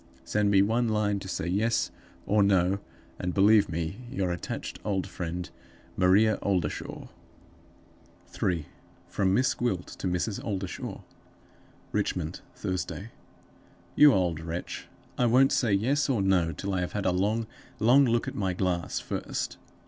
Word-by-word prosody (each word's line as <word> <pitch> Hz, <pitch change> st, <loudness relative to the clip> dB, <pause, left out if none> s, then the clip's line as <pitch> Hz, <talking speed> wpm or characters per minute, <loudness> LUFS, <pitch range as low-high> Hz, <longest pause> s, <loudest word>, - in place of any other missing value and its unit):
"Send 105 Hz, -1 st, +1 dB
me 100 Hz, -1 st, +5 dB
one 115 Hz, +3 st, +1 dB
line 105 Hz, -2 st, +1 dB
to 95 Hz, -, -8 dB
say 90 Hz, -, -3 dB
Yes 105 Hz, +6 st, +1 dB, 0.3 s
or 105 Hz, 0 st, +3 dB
No; 95 Hz, -1 st, +3 dB, 0.4 s
and 90 Hz, 0 st, -2 dB
believe 105 Hz, +1 st, +5 dB
me 85 Hz, +3 st, -3 dB
your 95 Hz, -8 st, -1 dB
attached 85 Hz, -, -5 dB
old 95 Hz, -2 st, -1 dB
friend, 90 Hz, 0 st, -5 dB, 0.5 s
"MARIA 100 Hz, +4 st, +4 dB
OLDERSHAW." 90 Hz, -6 st, -2 dB, 1.2 s
3. 85 Hz, -5 st, -2 dB, 0.4 s
From 95 Hz, -1 st, +1 dB
Miss 130 Hz, +3 st, +3 dB
Gwilt 105 Hz, -8 st, -1 dB
to -, -, -2 dB
Mrs. 90 Hz, +4 st, -1 dB
Oldershaw. 95 Hz, -4 st, -4 dB, 0.9 s
Richmond, -, -, -2 dB
Thursday. 95 Hz, +3 st, -4 dB, 0.8 s
'YOU 150 Hz, -1 st, +8 dB
OLD 90 Hz, -, +1 dB
WRETCH 85 Hz, +2 st, -5 dB, 0.3 s
I 125 Hz, -, +4 dB
won't 130 Hz, +3 st, +5 dB
say 120 Hz, -4 st, +2 dB
Yes 135 Hz, +9 st, +2 dB
or 115 Hz, -7 st, +2 dB
No 90 Hz, -4 st, +3 dB
till 100 Hz, +3 st, -4 dB
I 95 Hz, -, 0 dB
have 90 Hz, -, -3 dB
had 100 Hz, -1 st, -2 dB
a 95 Hz, -, +3 dB
long, 105 Hz, +5 st, +1 dB, 0.3 s
long 125 Hz, +6 st, +5 dB
look 120 Hz, -1 st, +1 dB
at -, -, -3 dB
my 95 Hz, -2 st, -1 dB
glass 90 Hz, -1 st, -1 dB
first. -, -, -4 dB
100 Hz, 145 wpm, -28 LUFS, 90-110 Hz, 1.2 s, YOU